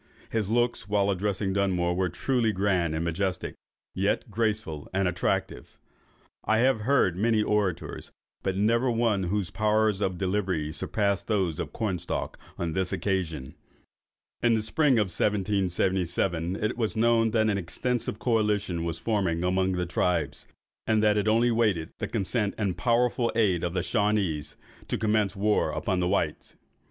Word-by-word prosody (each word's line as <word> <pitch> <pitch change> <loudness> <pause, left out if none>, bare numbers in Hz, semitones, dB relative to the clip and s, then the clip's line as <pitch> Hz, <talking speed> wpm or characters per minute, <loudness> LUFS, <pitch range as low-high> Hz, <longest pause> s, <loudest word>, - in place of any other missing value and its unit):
His 110 -3 -1
looks, 120 -3 0
while 100 -1 +2
addressing 95 0 -1
Dunmore, 90 -3 +1
were 90 0 0
truly 115 +5 0
grand 95 -5 0
and 80 +1 -1
majestic, 90 +2 -2 0.4
yet - - -1
graceful 105 -9 -2
and 95 0 +1
attractive. 90 0 -2 0.7
I 110 - +2
have 125 0 +3
heard 115 -7 +2
many 110 +3 +2
celebrated 105 - +1 0.3
orators, - - -8 0.3
but 95 -1 -2
never 115 +5 +2
one 115 -5 +1
whose 95 0 -1
powers 110 -1 +1
of 95 -3 0
delivery 95 -5 -1
surpassed 100 0 -1
those 95 -7 0
of - - -4
Cornstalk 95 -6 -3 0.2
on 85 -2 -2
this 95 0 -1
occasion." 80 -9 -2 0.9
In 120 -1 +4
the 110 - 0
spring 145 +6 +2
of 105 -5 +2
1777, 95 -3 0
it 110 +3 -2
was 110 -2 -1
known 115 0 +3
that 110 -1 +2
an 100 -2 +1
extensive 115 +6 -2
coalition 105 -7 0
was 85 -1 -2
forming 95 -7 0
among 95 +1 +1
the 90 0 -1
tribes, 85 -7 -1 0.4
and 110 -1 +2
that 105 -1 +4
it 105 0 0
only 115 +2 +3
waited 105 -8 +1
the - - -2
consent 100 +1 -1
and 100 -5 -1
powerful 120 0 +1
aid 95 -7 +2
of 85 +1 -2
the 90 - 0
Shawanees, 100 -9 0 0.3
to - - -1
commence 105 -2 +1
war 105 +2 +1
upon 95 -3 -1
the 90 - +1
whites. 85 -5 -1
100 Hz, 155 wpm, -27 LUFS, 90-110 Hz, 0.9 s, In